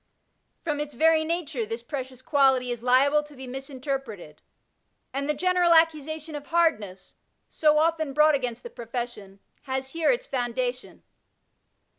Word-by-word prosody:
From 300 Hz, -3 st, -2 dB
its 295 Hz, -2 st, -4 dB
very 320 Hz, +3 st, +4 dB
nature 315 Hz, -6 st, -2 dB
this 225 Hz, +2 st, -5 dB
precious 260 Hz, -2 st, -6 dB
quality 265 Hz, -4 st, +3 dB
is 240 Hz, -1 st, -4 dB
liable 270 Hz, +4 st, +4 dB
to 295 Hz, -1 st, -15 dB
be 265 Hz, 0 st, -8 dB
misinterpreted, 260 Hz, -, -6 dB, 0.7 s
and 280 Hz, +2 st, -2 dB
the -, -, +3 dB
general 355 Hz, +1 st, +3 dB
accusation 315 Hz, -1 st, +1 dB
of 290 Hz, -1 st, -7 dB
hardness, 220 Hz, -, 0 dB, 0.4 s
so 305 Hz, -1 st, +3 dB
often 315 Hz, -2 st, +1 dB
brought 300 Hz, +2 st, +4 dB
against 250 Hz, -4 st, -2 dB
the 480 Hz, -, -8 dB
profession, 230 Hz, -, -6 dB, 0.3 s
has 265 Hz, 0 st, -3 dB
here 330 Hz, -1 st, +1 dB
its -, -, +1 dB
founda 245 Hz, -, -1 dB
tion. 255 Hz, -, -15 dB
275 Hz, 145 wpm, -26 LUFS, 250-315 Hz, 0.7 s, very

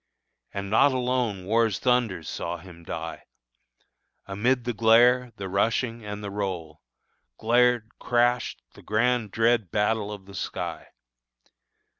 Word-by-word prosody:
And 100 Hz, 0 st, -5 dB
not 140 Hz, +5 st, +5 dB
alone 125 Hz, -6 st, -1 dB
War's 115 Hz, +1 st, +2 dB
thunders 120 Hz, -, 0 dB
saw 85 Hz, +1 st, -4 dB
him 85 Hz, -1 st, -14 dB
die; -, -, -6 dB, 1.0 s
Amid 120 Hz, +6 st, 0 dB
the 120 Hz, 0 st, -2 dB
glare, 120 Hz, +3 st, +4 dB
the 100 Hz, -, -6 dB
rushing, 115 Hz, +4 st, 0 dB
and 105 Hz, 0 st, -6 dB
the 100 Hz, -, -5 dB
roll, 90 Hz, -6 st, -4 dB, 0.6 s
Glared, 120 Hz, -1 st, +2 dB
crashed, 120 Hz, 0 st, +1 dB
the -, -, -15 dB
grand 120 Hz, +1 st, +1 dB
dread 115 Hz, -1 st, +2 dB
battle 105 Hz, +2 st, 0 dB
of 100 Hz, -2 st, -8 dB
the 100 Hz, -, -13 dB
sky! -, -, -5 dB
110 Hz, 125 wpm, -26 LUFS, 100-120 Hz, 1.0 s, not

